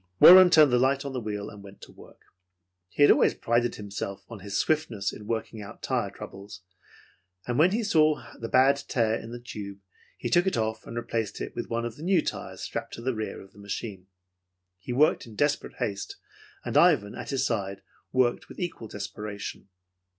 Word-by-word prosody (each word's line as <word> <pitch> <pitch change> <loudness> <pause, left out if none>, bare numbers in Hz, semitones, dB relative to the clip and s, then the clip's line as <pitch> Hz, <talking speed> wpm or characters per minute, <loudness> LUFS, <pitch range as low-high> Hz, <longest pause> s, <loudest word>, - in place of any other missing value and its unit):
Warren 185 0 +10
turned 155 -5 +6
the 125 - +4
light 135 +2 +2
on 140 - -4
the 130 - -2
wheel 105 -2 -5
and 105 - -12
went 100 0 -13
to - - -12
work. - - -17 0.7
He 145 - +2
had - - +8
always - - +4
prided 120 +1 0
himself 100 -1 -6
on 115 -3 -8
his 100 +1 -4
swiftness 115 -10 0
in 105 - -10
working 110 -1 -3
out 100 - -11
tire - - 0
troubles, 100 -1 -10 0.8
and 120 +2 -1
when 165 +4 +6
he 225 +4 -1
saw 155 -6 +3
the 115 - -5
bad 135 +2 +5
tear 115 -4 +1
in 115 0 -4
the 120 - -7
tube, 105 -5 -8 0.4
he - - -4
took 175 +2 +3
it 190 - +1
off 110 0 -2
and 115 - -6
replaced 115 -3 -3
it - - -5
with - - -5
one 115 0 -1
of 115 -1 -6
the 150 - -9
new 180 -2 +3
tires - - -5
strapped - - -5
to - - -9
the 130 +1 0
rear 110 -3 -5
of 95 0 -15
the 105 - -17
machine. 100 -1 -6 0.7
He 95 - -7
worked 140 0 +2
in 110 - -12
desperate 145 +5 0
haste, 105 -6 -4 0.5
and - - 0
Ivan, 100 0 +4
at - - -7
his 135 -1 0
side, 100 -5 -2 0.3
worked 125 -2 +1
with - - -11
equal 175 -10 -4
desperation. 105 0 -7
115 Hz, 200 wpm, -27 LUFS, 105-135 Hz, 0.8 s, Warren